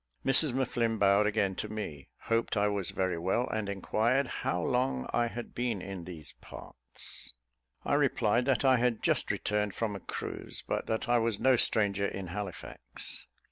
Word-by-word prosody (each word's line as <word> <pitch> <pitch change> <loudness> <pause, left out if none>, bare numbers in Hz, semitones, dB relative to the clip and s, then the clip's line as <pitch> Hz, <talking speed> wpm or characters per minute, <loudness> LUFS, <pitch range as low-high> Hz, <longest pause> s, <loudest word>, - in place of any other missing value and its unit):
Mrs 135 +1 +5
M'Flinn 120 -3 0
bowed 100 +1 +4
again 105 -2 +1
to 105 - -3
me, 95 -10 -6
hoped 115 -1 0
I 105 0 +3
was 100 -3 -1
very 95 -3 -1
well, 95 +9 0
and 110 -2 -2
inquired 115 +7 +1 0.2
"how 90 - 0
long 125 - 0
I 120 0 +2
had 120 +1 -7
been 120 -4 -1
in 95 -2 -7
these 80 -5 -9
parts." - - -9 0.5
I - - 0
replied 125 -5 +2
that 135 0 +2
I 130 -1 +6
had 120 -2 0
just - - +1
returned 105 -2 -1
from 110 -3 -2
a - - -5
cruise, - - -5
but - - -2
that 110 +2 -1
I 120 0 +4
was 115 -2 0
no 130 -1 +5
stranger 100 -4 +4
in 95 - -5
Halifax. 100 -3 -6
105 Hz, 175 wpm, -30 LUFS, 100-120 Hz, 0.5 s, I